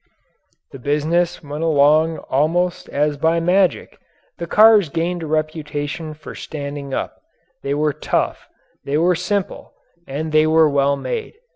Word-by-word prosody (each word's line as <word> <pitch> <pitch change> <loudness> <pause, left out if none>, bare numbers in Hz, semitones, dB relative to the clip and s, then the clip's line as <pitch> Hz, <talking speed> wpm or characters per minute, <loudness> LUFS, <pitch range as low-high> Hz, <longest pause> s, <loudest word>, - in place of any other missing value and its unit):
The 135 - -10
business 160 +7 0
went 150 +2 -5
along 155 +1 +3
almost 170 +6 0
as 145 0 0
by 160 +3 +2
magic. 180 +2 +1 0.4
The 170 - -4
cars 215 -3 +6
gained 170 +3 -2
a 160 - -5
reputation 155 0 -3
for 155 - -10
standing 140 -2 -7
up. - - -4 0.4
They 140 +1 -2
were 150 0 +1
tough, - - -2 0.3
they 140 +1 -1
were 175 +3 +3
simple, 190 +3 -3 0.3
and 155 +4 -4
they 155 0 +4
were 160 0 +5
well 140 -1 +2
made. 445 - -5
155 Hz, 140 wpm, -20 LUFS, 145-170 Hz, 0.4 s, cars